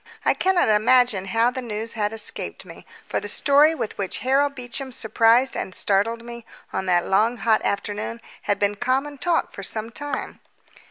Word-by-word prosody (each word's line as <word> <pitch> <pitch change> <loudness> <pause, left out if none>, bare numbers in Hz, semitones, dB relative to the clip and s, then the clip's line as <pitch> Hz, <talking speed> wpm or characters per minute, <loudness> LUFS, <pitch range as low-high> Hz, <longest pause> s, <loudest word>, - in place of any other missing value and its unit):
I - - +4
cannot 375 -2 +2
imagine 220 -1 +3
how 225 +5 +2
the 260 - -5
news 225 -1 -4
had 210 -2 -1
escaped 225 -1 -2
me, - - -13 0.2
for - - -2
the - - -7
story 295 +3 +4
with 225 - -4
which 195 -2 -1
Harold 280 +2 +2
Beecham 255 +1 -4
surprised 230 +3 +3
and 185 - -4
startled 225 +4 0
me 235 0 -9 0.3
on 190 - -2
that 175 -1 +2
long 220 +5 +2
hot 220 -1 +2
afternoon 210 +3 -3 0.3
had 205 - +3
been 205 0 +1
common 265 +6 -1
talk 335 +3 0
for - - -8
some 220 +3 -3
time. 290 +1 -5
230 Hz, 175 wpm, -23 LUFS, 210-260 Hz, 0.3 s, I